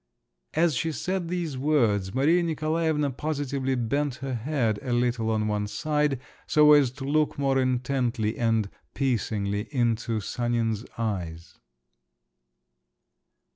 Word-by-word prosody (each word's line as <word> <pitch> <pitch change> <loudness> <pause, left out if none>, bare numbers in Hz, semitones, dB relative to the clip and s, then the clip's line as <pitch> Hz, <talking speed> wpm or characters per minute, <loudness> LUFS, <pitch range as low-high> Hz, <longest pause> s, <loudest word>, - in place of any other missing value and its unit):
As 165 0 +3
she 160 +5 -1
said 180 +5 -2
these 165 -6 -3
words, 115 -10 +1
Maria 155 +7 +4
Nikolaevna 155 -2 0
positively 140 -1 -2
bent 130 +3 -1
her 135 0 -5
head 120 -3 0
a 130 - -4
little 120 -2 +1
on 110 -1 0
one 105 -1 -1
side 150 +2 0 0.3
so 150 0 +6
as 145 -4 +5
to 135 - -8
look 150 +2 +1
more 135 -1 +2
intently 125 -3 0
and 115 -3 +1 0.3
piercingly 105 -6 -1
into 120 -3 0
Sanin's 115 0 -1
eyes. 90 -6 -4
130 Hz, 120 wpm, -26 LUFS, 115-150 Hz, 0.3 s, so